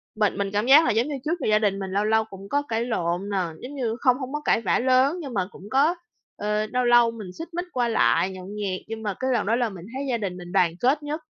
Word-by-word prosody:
bệnh 210 -2 +1
mình 200 -1 -1
cảm 210 +3 +1
giác 295 +5 +7
là - - +2
giống 230 +5 +1
như 290 - -3
trước 335 +3 -1
giờ - - -2
gia 215 0 +4
đình 200 -2 0
mình 190 -1 -5
lâu 200 +2 +1
lâu 220 +1 +3
cũng 195 -1 -11
có 285 - +1
cãi 230 +1 -1
lộn 180 -3 -2
nè. 200 - -1 0.2
Giống 270 +4 -8
như 235 -5 -1
không 255 -2 +3
hông 265 0 -6
có 295 - -2
cãi - - +3
vã 205 - +1
lớn 260 +6 +3
nhưng 275 -5 -7
mà 190 -4 0
cũng 200 - -12
có, 295 +7 +3 0.4
ờ, 210 +1 -1
lâu 250 +2 0
lâu 240 -1 +5
mình 220 -4 -8
xích 330 +1 -8
mích 350 +1 -3
qua 245 -2 +1
lại, 205 -4 +2
nhậu 185 -1 -9
nhẹt, 200 -2 -4
nhưng 225 0 -6
mà 205 -2 -1
cái 260 0 0
lần 230 -4 0
đó 225 - +2
là 240 -1 0
mình 185 -3 -10
thấy 270 +1 -3
gia 235 - +1
đình 190 -4 -4
mình 175 0 -9
đoàn 180 -4 +3
kết 280 +6 +2
nhất. 305 +2 -4
225 Hz, 290 wpm, -24 LUFS, 200-260 Hz, 0.4 s, giác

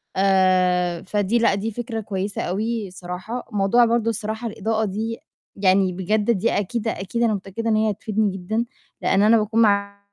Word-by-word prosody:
آآ 185 -2 +2
فدي 205 +3 0
لأ، 230 - +3
دي 215 +3 -3
فكرة 230 0 -4
كويسة 200 0 -3
أوي 215 +2 -2
الصراحة، 180 +6 -6
موضوع 210 +4 +4
برضه 230 0 +1
الصراحة 220 +1 -3
الإضاءة 220 0 -1
دي 220 +3 -3 0.4
يعني 190 -1 +3
بجد 210 +5 0
دي 225 +1 +1
أكيد، 220 +3 -2
أكيد 225 +3 -2
أنا 225 - +3
متأكدة 200 +3 -4
إن 220 - +3
هي 215 0 +2
هتفيدني 210 0 -1
جدًا، 215 +5 -2 0.4
لإن 195 - +2
أنا 225 +2 +6
باكون 220 +2 +1
معلِّيه 200 -1 +2
210 Hz, 165 wpm, -22 LUFS, 190-225 Hz, 0.4 s, أنا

